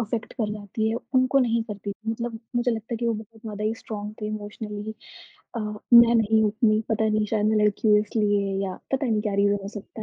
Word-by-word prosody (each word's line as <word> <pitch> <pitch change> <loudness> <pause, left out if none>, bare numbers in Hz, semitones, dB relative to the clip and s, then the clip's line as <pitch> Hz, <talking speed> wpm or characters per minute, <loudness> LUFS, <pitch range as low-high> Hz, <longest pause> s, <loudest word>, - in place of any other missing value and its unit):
affect 225 0 -3
कर 215 -4 -2
जाती 215 +1 -2
हैं, 230 - -1 0.2
उनको 255 +1 +4
नहीं 235 -3 +2
करती 205 -2 -6
थी, 220 +2 -5
मतलब 230 0 -4 0.2
मुझे 240 +1 +2
लगता 225 +1 -4
है - - 0
कि 235 +1 -2
वो 230 - +2
बहुत 220 +1 -10
ज़्यादा 210 -1 -5
ही 220 +1 +1
स्ट्रॉन्ग 210 -2 -6
थे - - -1
इमोशनली 210 0 -5 0.6
अ, - - -1
मैं 230 +3 +5
नहीं 220 -1 +4
हूँ 215 - +4
उतनी, 215 0 +2
पता 220 0 +1
नहीं 215 0 +1
शायद 210 -1 +1
मैं 215 0 +3
लड़की 210 +1 +1
हुई 210 0 +6
इसलिए 205 -2 0
या 190 -1 -3 0.2
पता 270 0 +1
नहीं 220 -2 +1
क्या 205 -2 -1
रीजन 205 0 +3
हो 195 - -5
सकता 210 +1 -8
215 Hz, 235 wpm, -25 LUFS, 210-225 Hz, 0.6 s, हुई